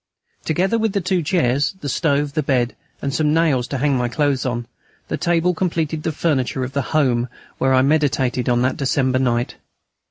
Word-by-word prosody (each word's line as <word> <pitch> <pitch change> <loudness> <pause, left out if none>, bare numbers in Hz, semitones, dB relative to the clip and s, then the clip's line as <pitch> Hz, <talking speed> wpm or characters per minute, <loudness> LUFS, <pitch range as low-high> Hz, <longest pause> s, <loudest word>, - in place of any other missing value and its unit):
Together 185 +8 +1
with 220 -2 0
the 200 - +1
two 185 0 0
chairs, 145 -3 +1
the 145 - -4
stove, 145 0 0
the 155 - +1
bed, 130 -4 0 0.3
and 140 - -1
some 150 0 +2
nails 150 -7 +2
to 140 - -3
hang 140 +1 +1
my 125 -1 0
clothes 140 -1 0
on, 120 -1 -2 0.4
that - - -3
table 175 +1 +2
completed 160 -3 -1
the 160 - -1
furniture 135 -5 0
of 130 +1 -5
the 140 - 0 0.2
"home" 125 -4 +2 0.3
where 130 0 +3
I 130 - +4
meditated 130 -4 +1
on 120 0 +2
that 130 - 0
December 130 -1 +1
night. 120 -2 0
140 Hz, 190 wpm, -20 LUFS, 130-160 Hz, 0.4 s, I